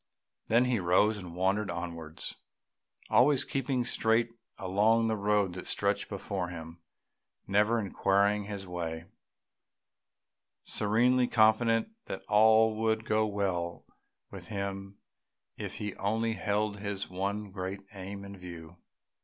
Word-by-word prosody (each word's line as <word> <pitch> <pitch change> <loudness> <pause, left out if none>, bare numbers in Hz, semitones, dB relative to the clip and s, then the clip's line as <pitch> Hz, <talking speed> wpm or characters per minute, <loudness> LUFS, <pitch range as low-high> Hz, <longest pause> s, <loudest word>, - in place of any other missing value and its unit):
Then 120 +3 +4
he 125 -3 +1
rose 100 +4 +3
and 90 -3 -9
wandered 95 +3 +1
onwards, 85 -2 -5 0.8
always 130 +5 +5
keeping 130 -2 -1
straight 115 +1 +2 0.3
along 105 +4 +2
the 110 - +1
road 100 -2 +1
that 90 - -7
stretched - - 0
before 95 -3 -3
him, 85 -1 -9 0.6
never 105 +4 +3
inquiring 100 0 +1
his 100 -1 -6
way, 85 -2 -4 1.6
serenely 120 +4 +2
confident 115 - +3
that 95 - -6
all 110 +1 +5
would 110 0 +1
go 110 0 +2
well 95 -4 -2 0.5
with - - -9
him 100 -1 -5 0.6
if - - -6
he 105 -2 -4
only 110 +3 0
held 105 0 -1
his 100 -1 -3
one 100 +2 -3
great 95 +1 -5
aim 100 +1 -7
in 100 0 -9
view. 85 -2 -10
100 Hz, 120 wpm, -30 LUFS, 95-110 Hz, 1.6 s, always